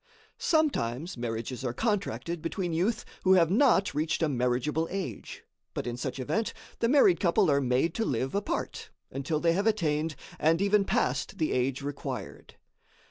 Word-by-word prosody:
Sometimes 175 - 0
marriages 120 +1 -4
are 120 -2 -2
contracted 195 - -1
between 175 +1 -2
youth 190 +8 0 0.2
who 190 - +5
have 170 -3 +4
not 220 -3 +4
reached 155 +3 0
a - - +3
marriageable 130 +5 0
age, 180 - -5 0.3
but - - -3
in 120 -1 -3
such 125 +2 -4
event, 155 - -1 0.2
the 230 - +2
married 295 +7 +5
couple 185 -2 +3
are 140 0 +3
made 130 +6 +1
to 225 - -1
live 130 - -1
apart, 200 0 -3 0.2
until 140 +3 -2
they 165 +1 +3
have 200 +5 0
attained 160 -7 +1 0.2
and 165 +2 +3
even 200 +1 +3
passed - - 0
the 155 - 0
age 130 +2 0
required. 140 0 -6
160 Hz, 160 wpm, -29 LUFS, 130-200 Hz, 0.3 s, who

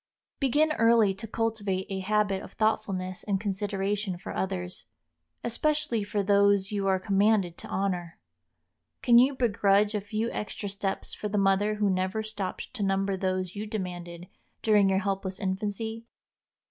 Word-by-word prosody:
Begin 295 +3 +3
early 230 -3 +5
to 215 +4 -8
cultivate 210 -4 -1
a 190 - -2
habit 200 0 +1
of - - -11
thoughtfulness 195 -4 -1
and 200 -2 0
consideration 200 -1 -2
for 175 - -7
others, 90 - -3 0.6
especially 240 -2 0
for 205 0 -1
those 200 0 +3
you 200 -2 -1
are 190 -1 +3
commanded 200 -2 +2
to - - -8
honor. 180 -4 -2 0.9
Can 240 -2 +7
you 265 +3 +4
begrudge 205 -4 +3
a 210 - -1
few 215 +3 -2
extra 205 -1 -4
steps 195 0 -3
for 210 - -4
the 205 - -1
mother 200 +2 +3
who 210 -1 +1
never 190 +3 0
stopped 210 -1 -5
to 245 - -5
number 195 0 +1
those 185 -1 -2
you 210 +1 -4
demanded 175 -4 -5 0.4
during 210 -3 +5
your 190 - +2
helpless 195 -1 -2
infancy? 210 +4 -3
200 Hz, 150 wpm, -28 LUFS, 190-215 Hz, 0.9 s, Can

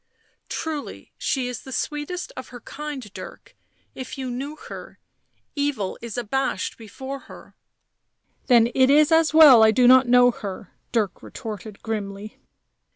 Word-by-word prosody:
" - - -45
Truly 310 -3 -6
she 260 -3 -1
is 250 -2 -6
the 265 - -11
sweetest 300 +7 -4
of 260 - -8
her 245 - -11
kind, 295 +1 -7
Dirk; - - -11 0.4
if 260 +1 -8
you 260 -2 -4
knew 275 +5 -5
her - - -10 0.3
— - - -49 0.3
evil 285 -10 -1
is 235 -1 -7
abashed 245 +3 -2
before 265 +5 -8
her - - -14 0.3
" - - -54
" - - -44
Then 235 -2 +5
it 260 0 +4
is 295 +2 +5
as 320 -1 +4
well 300 -7 +8
I 220 - +7
do 245 +2 +4
not 255 0 +7
know 245 0 +6
her," 205 -7 -8 0.2
Dirk 215 -5 -1
retorted 215 -3 -8
grimly. 210 -1 -5
255 Hz, 160 wpm, -23 LUFS, 225-285 Hz, 0.4 s, well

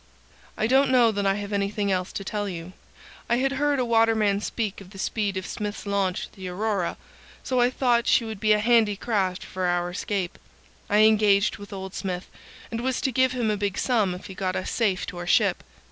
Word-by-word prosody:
"I 215 - +1
don't 265 +4 +4
know 245 -3 +5
that 200 -1 -1
I 195 - +3
have 205 0 -5
anything 200 0 0
else 185 0 -1
to 195 - -4
tell 205 +1 -3
you. 175 0 -7 0.6
I 235 - +4
had 265 +2 +1
heard 285 +1 +1
a 255 - +1
waterman 225 -3 +3
speak 210 -3 -3
of 190 - -12
the 195 - -13
speed 200 0 -1
of 190 - -4
Smith's 210 0 -5
launch 200 -2 -1
the 190 -1 -8
Aurora, 195 0 -1 0.5
so 255 -2 +1
I 245 - +4
thought 245 -2 +1
she 235 - +4
would 220 -3 -6
be 215 +1 +2
a - - +3
handy 220 -1 +3
craft 195 -4 -1
for 185 0 -4
our 175 0 0
escape. 185 -1 -3 0.5
I 210 +1 +4
engaged 210 -2 +4
with 205 0 -11
old 190 -1 -6
Smith, 180 -1 -4 0.4
and 230 0 -3
was 260 0 -1
to 265 - 0
give 260 +1 +2
him 235 -4 0
a 210 - -1
big 200 -1 -2
sum 215 -8 +1
if 180 - -10
he 190 - -8
got 185 -1 -2
us 185 - -3
safe 205 -6 0
to 175 - -7
our 175 - -6
ship. - - +3
205 Hz, 220 wpm, -25 LUFS, 190-230 Hz, 0.6 s, know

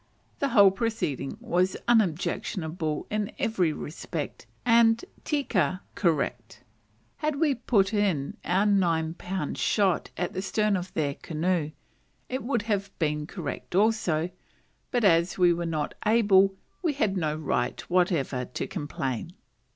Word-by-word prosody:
The 280 - +1
whole 200 -6 +7
proceeding 205 - -2
was 185 -5 +1
unobjectionable 170 -6 0
in 210 -1 -1
every 220 - +1
respect, 150 +1 -6 0.2
and 230 +2 +5 0.2
tika 190 - 0
(correct). 165 -7 -1 0.5
Had 305 -1 -1
we 295 -1 +2
put 225 -5 +1
in 190 -10 0
our 190 +3 +2
nine 170 -6 +2
pound 180 -2 -4
shot 195 -5 +2
at 180 0 -2
the 185 - -2
stern 210 +1 +1
of 185 0 -4
their 145 -3 0
canoe, 165 +1 -1 0.6
it 260 +1 -2
would 235 -4 -1
have 200 -2 -1
been 150 -2 -1
correct 175 -1 -6
also; 185 -6 +2 0.6
but 245 -2 0
as 170 -2 +4
we 175 -2 +5
were 170 0 -3
not 155 -3 -2
able, 200 -3 +4 0.3
we 330 -5 +1
had 220 -8 0
no 155 -4 0
right 135 -5 -1
whatever 165 -8 +1
to 125 - -4
complain. 145 - -4
185 Hz, 135 wpm, -27 LUFS, 160-215 Hz, 0.6 s, whole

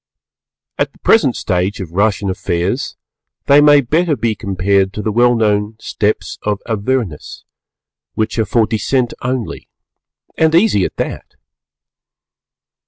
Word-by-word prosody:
At - - 0
the - - -22
present 145 - +3
stage 95 +2 -1
of 90 -5 -6
Russian 100 +1 0
Affairs 90 +7 -2 0.5
they 140 +1 +6
may 145 -1 +6
better 155 +5 +1
be 115 -1 -1
compared 100 -1 0
to 105 - -4
the 110 - -1
well 120 +2 +3
known 105 -1 0
Steps 105 0 -2
to 105 -1 0
Avernus, 110 - -3 0.7
which 110 +1 -1
are 110 - +2
for 110 +2 +2
descent 120 +3 -1
only 125 -2 -4 0.7
and 160 0 +2
easy 170 - +3
at - - -5
that! - - -5
110 Hz, 130 wpm, -16 LUFS, 100-130 Hz, 0.7 s, they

